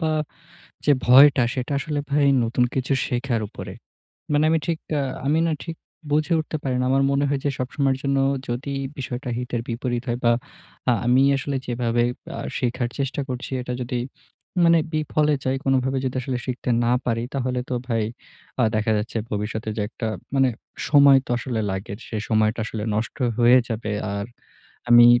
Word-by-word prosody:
বা 160 -1 +1 0.7
যে 145 - +5
ভয়টা 135 +2 +7
সেটা 130 +2 -3
আসলে 150 0 -2
ভাই 145 0 +3 0.2
নতুন 125 +2 +1
কিছু 130 +1 0
শেখার 120 -1 -1
উপরে। - - -8 0.6
মানে 145 +1 +3
আমি 160 0 +3
ঠিক 165 -2 0 0.2
আ - - +1 0.2
আমি 150 +3 +3
না - - +1
ঠিক 165 -1 -6 0.4
বুঝে 155 +3 +2
উঠতে 155 0 -3
পারি 130 -2 -1
না। - - +1
আমার 135 +1 +3
মনে 140 +1 +2
হয় 140 -1 0
যে - - +3
সবসময়ের 135 +1 0
জন্য 140 0 +1 0.3
যদি 130 +4 -3 0.2
বিষয়টা 125 -1 -4
হিতের 125 -1 -3
বিপরীত 120 0 -2
হয় 120 0 -1
বা 120 - +6 0.6
আ - - +6
আমি 125 +2 +4 0.2
আসলে 140 +1 -3
যেভাবেই 120 0 +1 0.3
আ - - -5 0.2
শিখার 125 -1 -1
চেষ্টা 140 0 -2
করছি, 125 0 -5
এটা 125 0 -4
যদি 125 0 -2 0.6
মানে 170 0 +6
বিফলে 155 -1 +1
যায়, 130 +1 0
কোনভাবে 135 0 +1
যদি 130 - -2
আসলে 125 0 -2
শিখতে 125 0 -3
না 120 - +2
পারি, 115 -1 0
তাহলে 130 -2 -1
তো - - -1
ভাই 115 -3 0 0.6
আ - - +4
দেখা 110 +1 +1
যাচ্ছে 110 +3 -3
ভবিষ্যতে 105 +1 -3
যে - - 0
একটা 115 0 -4 0.3
মানে 135 -1 +4 0.4
সময় 140 -2 +7
তো - - -18
আসলে 120 -1 -3
লাগে। 95 +2 -4
সেই 110 -2 -3
সময়টা 110 0 +2
আসলে 110 -1 -4
নষ্ট 110 +1 -3 0.2
হয়ে 120 +1 +6
যাবে। 110 -2 -3 0.2
আর 100 0 -3 0.6
আমি, 120 0 +9
125 Hz, 175 wpm, -23 LUFS, 120-140 Hz, 0.7 s, আমি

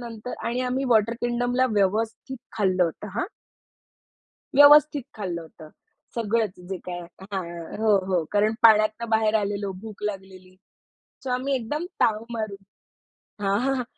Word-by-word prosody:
नंतर 235 0 -7
आणि 240 +2 -1
आम्ही 265 +2 -1
वॉटर 230 -1 +4
किंगडमला 245 +1 +1
व्यवस्थित 220 +6 0 0.2
खाल्लं 185 -3 +2
होतं 170 +5 -5
हां. - - +1 1.3
व्यवस्थित 290 0 +7
खाल्लं 180 -5 -4
होतं. 160 -1 -13 0.5
सगळंच 225 -4 -1
जे 190 - -3
काय 175 -1 -4
आहे 175 +2 -13
हां, 170 -3 -5
हो, 215 -2 +5
हो. 180 -4 +1
कारण 210 +2 +2
पाण्यातनं 215 +1 +5
बाहेर 220 -1 +2
आलेलो 200 -1 -2
भूक 215 -2 -10
लागलेली. 190 -2 -6 0.7
सो 260 - -3
आम्ही 260 +2 0
एकदम 280 +7 -2 0.2
ताव 220 0 +2
मारून 205 -4 -6 0.7
हां, 195 +1 +2
हां. 265 0 0
215 Hz, 135 wpm, -25 LUFS, 195-240 Hz, 1.3 s, व्यवस्थित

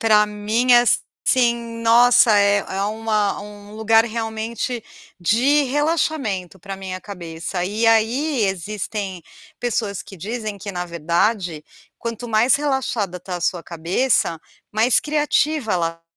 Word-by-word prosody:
Para 210 -2 +4
mim, 215 +4 +1
assim, 235 -1 +1
nossa, 235 -1 +6
é 200 0 +4
é 195 0 -4
uma 215 -1 -1
um 205 0 -11
lugar 225 +1 +4
realmente 225 +1 -4 0.4
de 250 - +3
relaxamento 275 - -1
para 195 +2 -7
minha 185 -1 -6
cabeça 175 -2 -5
e 215 +5 -1
aí 230 +4 +2
existem 195 0 -4 0.4
pessoas 215 -5 -2
que 205 -1 -12
dizem 215 +2 -5
que 200 +1 -6
na 180 -1 -3
verdade, 170 0 -1 0.3
quanto 235 +1 -5
mais 230 +3 +4
relaxada 265 -10 -1
está 180 0 -6
a 175 - -8
sua 180 0 -1
cabeça, 170 +2 0 0.3
mais 225 +4 +3
criativa 300 -4 0
ela 165 -1 -2
215 Hz, 125 wpm, -21 LUFS, 190-235 Hz, 0.4 s, nossa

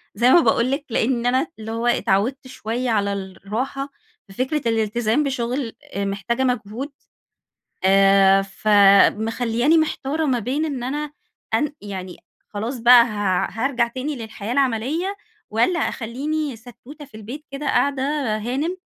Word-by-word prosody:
زي 235 +4 +3
ما 350 - +8
باقول 255 -6 +2
لِك 280 +2 -2
لإن 235 +1 0
أنا 260 +5 +2
اللي 220 0 -6
هو 230 +1 -2
اتعوِّدت 240 +4 +1
شوية 245 0 -3
على 200 -3 +1
الراحة، 210 +8 -4 0.4
ففكرة 260 +9 -2
الالتزام 225 +4 +1
بشغل 255 -2 -2 0.2
محتاجة 200 +5 -1
مجهود، 250 +2 -2 0.9
آآ، 195 0 +5
فمخلياني 215 +7 +3
محتارة 315 -1 -1
ما 255 -4 +1
بين 265 +8 -1
إن 275 -6 -4
أنا 295 +3 -3 0.4
أن 300 0 +1
يعني 190 -3 -7 0.3
خلاص 225 +5 -4
بقى 240 +1 +8
ه 205 -5 0
هارجع 240 +2 0
تاني 260 +5 -4
للحياة 220 -2 -7
العملية، 280 - 0 0.3
والَّا 235 +12 +1
اخليني 280 +5 -3
ستوتة 245 +6 -13
في 240 -6 -14
البيت 245 +8 -8
كده 275 +2 -6
قاعدة 275 -2 +1 0.3
هانم 270 - -2
240 Hz, 130 wpm, -22 LUFS, 215-275 Hz, 0.9 s, ما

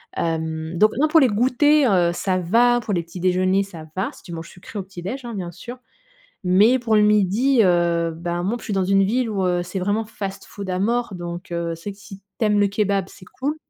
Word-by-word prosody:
Hem, 160 0 -3
donc 215 +4 +5
non, 305 - +4
pour 320 +1 +5
les 265 - +5
goûters, 255 +4 +3
heu, 175 -2 +3
ça 185 +1 -1
va 235 +7 +3
pour 210 - -3
les 170 - 0
petits 170 +2 -10
déjeuners, 185 +1 +2
ça 170 -5 -10
va. 190 - -2
Si - - -16
tu 175 - -11
manges 165 +1 -7
sucré 185 +4 -11
au 195 - -3
petit 190 -2 -11
déjeuner, 245 +9 -5
hein, 235 - -6
bien 175 -3 -5
sûr. 240 +8 -9 0.7
Mais 205 +8 +5
pour 225 -3 +1
le 210 - +5
midi, 210 +5 +3
heu, 170 -2 +2
bah, 175 +1 -3
moi 200 +6 -1
en - - -2
plus - - -11
je - - -10
suis 210 - -3
dans 190 -1 +1
une 195 +1 +3
ville 240 +4 0
où, 195 -3 -1
heu, 175 -1 +1
c'est 180 +2 -5
vraiment 205 +4 0
fast 195 -3 -6
food 200 -2 -8
à 180 - -1
mort. 230 +2 0
Donc 175 +1 -7
heu, 170 -1 -2
c'est 165 +5 -7
vrai - - -7
que - - -23
si 195 -1 -11 0.2
tu 225 - 0
aimes 210 -1 +3
le 205 - +4
kebab, 200 -2 0
c'est 185 - -15 0.2
cool. 290 +4 -1
195 Hz, 260 wpm, -22 LUFS, 175-225 Hz, 0.7 s, donc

